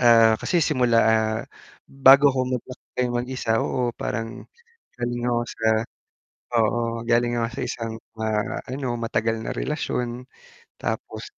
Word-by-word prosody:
Ah, 115 -2 +7
kasi 180 - 0
simula, 125 -5 +2
ah, 110 0 +2 0.7
bago 140 +2 +9
ako 130 -1 0
maglakbay 125 0 -4
mag-isa 125 -1 -3
oo, - - -2 0.2
parang 115 -1 -2 0.7
galing 120 0 -2
ako 120 -1 +1
sa 110 -1 -1 0.9
oo, 115 0 +3 0.3
galing 120 0 +3
ako 115 -1 0
sa - - -2
isang, 115 -1 -4 0.3
ah, 110 -1 -1
ano, 135 +1 -3 0.2
matagal 115 0 0
na - - -4
relasyon 120 - -2 0.7
tapos - - -4
120 Hz, 125 wpm, -24 LUFS, 115-125 Hz, 0.9 s, bago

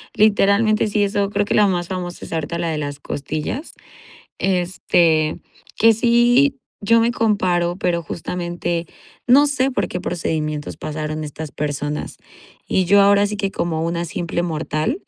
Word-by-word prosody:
literalmente, 215 +1 +3
sí, 205 0 +1
eso 200 0 0
creo 205 0 0
que - - -2
la 210 -1 +5
más 175 -2 -1
famosa 180 -2 -5
es - - -12
ahorita 165 +1 -2
la 170 -1 -2
de 155 - -2
las 145 -1 -4
costillas, 155 - -4 0.7
este, 175 -4 +1 0.4
que 225 +1 +6
sí, 240 +4 +3 0.2
yo 230 +3 +4
me 235 +1 +2
comparo, 180 -6 +1
pero 175 -3 -1
justamente 175 0 -4 0.4
no 275 +4 +6
sé 275 -2 +1
por 200 -8 -1
qué 180 - -4
procedimientos 155 -3 -3
pasaron 155 0 -4
estas 150 +1 -7
personas 145 0 -3 0.5
y 185 - +1
yo 200 +2 +6
ahora 200 0 +5
sí 210 0 -4
que 200 -1 -1
como 165 -4 -2
una 170 +1 -2
simple 170 +1 -3
mortal 160 - -2
180 Hz, 155 wpm, -20 LUFS, 160-210 Hz, 0.7 s, que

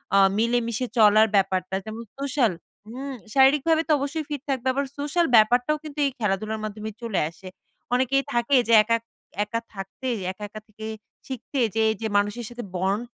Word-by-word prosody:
আ - - +6 0.2
মিলেমিশে 235 +1 0
চলার 215 0 +6
ব্যাপারটা, 190 -1 +1
যেমন 220 +1 -6 0.2
সোশ্যাল 275 -5 +1 0.4
হুম? 265 +4 -6 0.2
শারীরিকভাবে 295 +4 +4
তো - - +1
অবশ্যই 295 +3 -3
ফিট 290 -3 -4
থাকবে। 260 -1 -1
আবার 280 +1 0
সোশ্যাল 300 +4 +1
ব্যাপারটাও 245 +7 +4
কিন্তু 300 -1 -8
এই 275 - +1
খেলাধুলার 215 +1 -1
মাধ্যমে 215 0 -5
চলে 230 -5 -1
আসে। 170 +3 -14 0.5
অনেকেই 260 +2 +2
থাকে 240 +4 +2
যে 230 - +3
একা 230 +2 +2 0.5
একা 230 +2 -3 0.2
থাকতে, 195 +7 -7 0.2
একা, 210 +3 -11
একা 215 - -8
থেকে 220 +1 -10 0.4
শিখতে 260 +1 -5 0.2
যে 225 - +2
এই 220 - 0
যে 220 - -1
মানুষ 205 0 +1 0.2
সাথে 240 0 -7
bond 190 +4 0
235 Hz, 170 wpm, -25 LUFS, 215-270 Hz, 0.5 s, আ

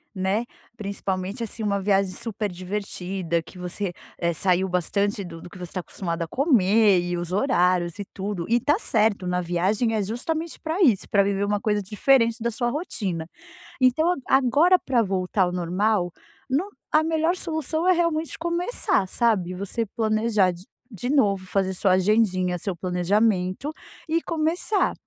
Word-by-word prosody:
né. 195 +5 0 0.3
Principalmente, 200 0 -3
assim, 225 0 -6
uma 200 -1 +1
viagem 195 -1 +2
super 215 -2 -3
divertida, 185 -2 -3
que 180 - -14
você, 180 +1 -4 0.2
eh, 170 0 0
saiu 185 +3 +1
bastante 200 +3 0
do 165 -2 -9
do - - -10
que - - -13
você 180 - -7
está 185 - -4
acostumado 170 -1 -4
a 165 - -5
comer 215 - +4
e 175 0 -2
os 175 0 -4
horários 180 - +1
e 200 - -4
tudo, 195 -3 -3
e 240 +1 +4
tá 295 - +2
certo, 210 - +1
na 180 0 0
viagem 190 +7 0
é 215 - +1
justamente 310 - -3
pra 325 +5 -2
isso, 235 - +4
pra 200 - +4
viver 200 0 0
uma 205 0 0
coisa 210 -1 +1
diferente 230 +3 +2
da 235 - 0
sua 240 +2 -1
rotina. 195 - -3 0.5
Então, 315 +8 +4
agora, 290 +8 +5
pra 250 -3 +1
voltar 190 -1 -1
ao 180 - 0
normal 180 +2 0 0.4
no 305 +10 0 0.2
a 310 +1 +4
melhor 320 +2 +1
solução 320 -1 -2
é - - +7
realmente 335 -2 0
começar, 340 - 0
sabe. 190 -5 +1
Você 200 +5 -2
planejar 215 -3 +2
de 175 +1 -11 0.3
de 245 +6 -4
novo 205 -10 +2
fazer 190 0 0
sua 185 0 +2
agendinha, 185 -2 +2
seu 195 0 -3
planejamento 185 - 0 0.3
e 330 +1 +1
começar. 335 +5 0
205 Hz, 165 wpm, -24 LUFS, 185-255 Hz, 0.5 s, é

